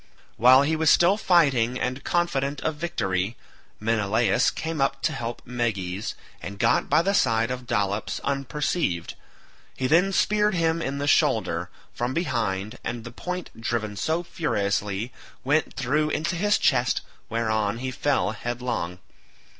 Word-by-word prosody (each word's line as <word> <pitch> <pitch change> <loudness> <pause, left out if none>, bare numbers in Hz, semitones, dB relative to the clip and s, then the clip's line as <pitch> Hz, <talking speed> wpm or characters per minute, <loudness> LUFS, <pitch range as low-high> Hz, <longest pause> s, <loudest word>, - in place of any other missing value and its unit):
While 130 +4 +7
he 160 +3 +1
was 160 0 +3
still 175 +5 +5
fighting 140 - +3
and 130 +2 -2
confident 145 -5 0
of 160 - -1
victory, 110 - -2 0.4
Menelaus 110 -1 +2
came 160 -3 -4
up 135 0 0
to - - +1
help 115 0 -5
Meges, 110 -5 -2 0.3
and 100 - -7
got - - +2
by 155 +3 +4
the 195 +2 +1
side 115 - +2
of 125 -1 -5
Dolops 105 -3 -1
unperceived; 140 - -1 0.6
he 130 - -2
then 170 +8 +4
speared 210 +1 +2
him 165 -1 +1
in 140 -2 -2
the 140 - -2
shoulder, 145 - +2 0.2
from 120 +2 -2
behind, 110 - -2
and 120 -1 -4
the 120 - -8
point, 180 +8 -5
driven 110 -2 -2
so 160 - -1
furiously, 105 - -2 0.3
went 150 +4 +1
through 150 +4 +1
into 160 +4 -1
his 205 +4 +2
chest, 125 -2 +2 0.3
whereon 110 -2 0
he 130 +2 -3
fell 135 -5 0
headlong. 120 -5 -3
125 Hz, 145 wpm, -25 LUFS, 110-160 Hz, 0.6 s, While